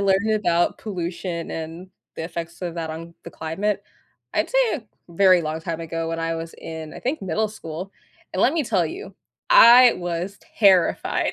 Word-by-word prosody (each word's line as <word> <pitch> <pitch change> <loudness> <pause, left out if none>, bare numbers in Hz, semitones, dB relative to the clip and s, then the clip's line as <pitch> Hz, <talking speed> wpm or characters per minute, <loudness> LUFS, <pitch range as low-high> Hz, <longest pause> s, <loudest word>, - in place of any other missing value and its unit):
learned 200 +2 +2
about 175 -5 +1
pollution 175 -3 -4
and 165 +3 -6 0.3
the 160 - -4
effects 170 +1 -6
of 175 -2 -3
that 165 -2 -4
on 165 +1 -8
the 170 - -8
climate 195 +7 -2 0.5
I'd - - 0
say - - +3
a 285 - -5 0.3
very 185 +1 +5
long 155 0 -3
time 165 0 -4
ago 165 0 -4
when 165 0 -3
I 165 0 -1
was 165 0 -6
in, 160 -1 -7
I - - -9
think, 260 -1 -3
middle 215 +3 0
school, 180 -3 -7 0.4
and - - +1
let - - +4
me 320 -3 0
tell 195 -7 +1
you, 390 +6 -7 0.3
I 250 - +8
was 175 +2 -4 0.2
terrified. 190 -5 +3
175 Hz, 180 wpm, -23 LUFS, 165-210 Hz, 0.5 s, I